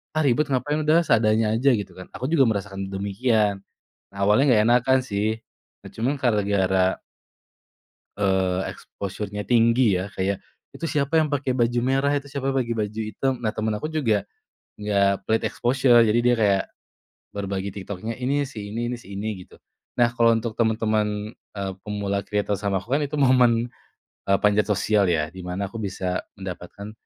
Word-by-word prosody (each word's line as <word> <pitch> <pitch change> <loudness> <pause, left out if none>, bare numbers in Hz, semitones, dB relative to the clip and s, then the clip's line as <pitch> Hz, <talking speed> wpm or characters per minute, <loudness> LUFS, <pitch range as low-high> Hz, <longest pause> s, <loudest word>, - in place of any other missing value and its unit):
"Ah - - +2
ribet 140 +3 +2
ngapain? 145 +4 0
Udah 155 +2 +4
seadanya 110 -1 +3
aja." 130 +4 +3
Gitu 100 -3 -5
kan, 95 - -9
aku - - -4
juga 160 -5 +5
merasakan 100 -2 -4
demikian. 100 0 0 0.5
Awalnya 100 +5 +3
nggak 105 - +4
enakan 125 +2 +4
sih. 110 -1 -2 0.4
Nah - - -10
cuma 125 +6 0
gara-gara 100 -5 +1 1.2
eee, 95 -2 +1
exposure-nya 105 +1 -6
tinggi 115 -4 +3
ya, 95 - -4
kayak, 95 +1 -1 0.3
"Itu 165 - -5
siapa 150 +2 +1
yang 155 - +1
pakai 140 -2 -1
baju 120 0 +2
merah? 135 +2 +2
Itu 140 0 -5
siapa 135 -1 -2
yang 130 -2 +1
baju 105 +1 -2
hitam?" 120 +4 -2
Nah 110 -2 0
temen 110 0 -1
aku 155 +9 -4
juga 115 -10 +1 0.6
enggak 100 -2 +1
pelit 110 0 +1
exposure, 125 -1 +4
jadi 110 +2 +3
dia 120 0 +4
kayak 100 -3 +3 0.7
berbagi 100 -1 -3
TikTok-nya, 100 +3 -5
"Ini 140 +3 0
si 105 -6 -8
ini 120 +1 -2
ini 125 - -3
si 100 -4 -13
ini," 105 +2 -3
gitu. - - -19 0.4
Nah 120 - +5
kalau 115 -1 +4
untuk 115 0 -3
teman-teman, 110 -2 0
eee, 100 -2 -7
pemula 100 -1 -2
kreator 105 0 -1
sama 100 -2 -1
aku 120 +7 -3
kan 150 - -1
itu 145 +1 -4
momen, 125 -3 +4 0.6
eee, 100 0 +3
panjat 105 0 +3
sosial 105 0 +2
ya, 80 -3 +1
di 95 - -10
mana 95 +2 -3
aku 115 - -7
bisa 90 -3 -2 0.2
mendapatkan, 95 +2 -8
110 Hz, 165 wpm, -24 LUFS, 100-125 Hz, 1.2 s, juga